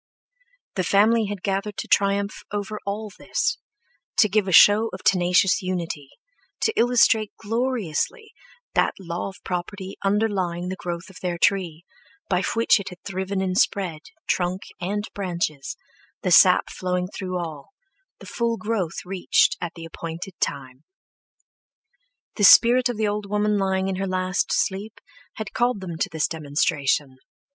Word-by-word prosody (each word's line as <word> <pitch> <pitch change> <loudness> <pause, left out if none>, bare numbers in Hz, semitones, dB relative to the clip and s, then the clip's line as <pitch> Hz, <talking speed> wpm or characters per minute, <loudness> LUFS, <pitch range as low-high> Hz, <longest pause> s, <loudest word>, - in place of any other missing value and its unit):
The 185 - +1
family 215 +4 +3
had 200 -2 -6
gathered 195 +1 -2
to - - -4
triumph 200 0 +1
over 210 +1 -4
all 210 +1 -3
this, 475 -1 -1 0.6
to 215 - +6
give 205 0 +1
a - - -1
show 210 +5 +7
of 185 - -8
tenacious 180 0 +3
unity, 170 -6 -4 0.5
to 445 - +1
illustrate 230 -3 +3
gloriously 235 - -2 0.4
that - - +2
law 175 0 -4
of 195 - -12
property 185 +2 -5
underlying 195 -4 0
the 190 - -3
growth 175 +1 -6
of 190 - -14
their 175 -2 -2
tree, 170 -3 +1 0.4
by 180 -1 +1
which 230 -1 +4
it 200 - -6
had 180 - -11
thriven 190 0 -3
and 185 0 0
spread, 175 -6 0 0.3
trunk 180 +1 -1 0.2
and 200 +3 -2
branches, 170 -6 -3 0.5
the 185 - 0
sap 180 +1 +6
flowing 180 -1 -2
through 185 -1 -5
all, 155 -5 -6 0.5
the - - -13
full 235 -1 -1
growth 210 -8 -3
reached 185 0 +2
at 175 -2 -4
the 165 -1 -8
appointed 165 +3 -7
time. 130 0 -3 1.5
The 205 - 0
spirit 245 +5 +7
of 240 - -3
the 215 -1 +1
old 205 0 -2
woman 210 0 +1
lying 190 0 0
in 190 -1 -2
her 195 +1 -2
last 185 0 0
sleep 205 +3 -1 0.4
had 215 -3 -6
called 240 -2 +1
them 180 -3 -6
to 200 - 0
this 160 -1 0
demonstration. 145 -3 0
190 Hz, 150 wpm, -24 LUFS, 175-210 Hz, 1.5 s, show